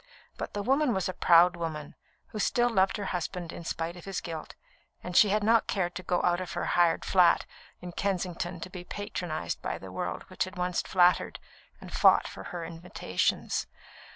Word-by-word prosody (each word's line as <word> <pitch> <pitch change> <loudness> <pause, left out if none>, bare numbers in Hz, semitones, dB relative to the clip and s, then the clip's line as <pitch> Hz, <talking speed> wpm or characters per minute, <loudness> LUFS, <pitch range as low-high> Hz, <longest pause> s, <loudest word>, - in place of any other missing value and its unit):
But - - -6
the 205 - -2
woman 270 +2 +2
was 190 - 0
a 185 - -3
proud 175 +1 +5
woman, 160 -3 -5 0.4
who 215 - -6
still 240 +3 +2
loved 190 -2 +2
her 205 - -4
husband 175 0 -4
in - - -8
spite 165 +1 -3
of 175 - -11
his 195 -1 -3
guilt, 160 -3 -7 0.5
and 180 -1 -6
she 210 - +7
had 210 +1 +1
not 225 +1 +4
cared 175 -3 -1
to 180 - -5
go 180 -1 0
out 175 0 +2
of 180 -2 -6
her 175 - -2
hired 170 -2 +3
flat 180 -3 +4 0.4
in 180 - -7
Kensington 180 -2 -2
to 180 - -6
be 180 -2 -7
patronised 180 - -4
by - - -3
the - - -10
world - - -4
which - - -2
had 185 +1 -10
once 180 0 0
flattered 180 -1 +2 0.4
and - - -11
fought - - +5
for - - -9
her 175 -2 -5
invitations. 170 +2 -2
180 Hz, 195 wpm, -29 LUFS, 170-195 Hz, 0.5 s, she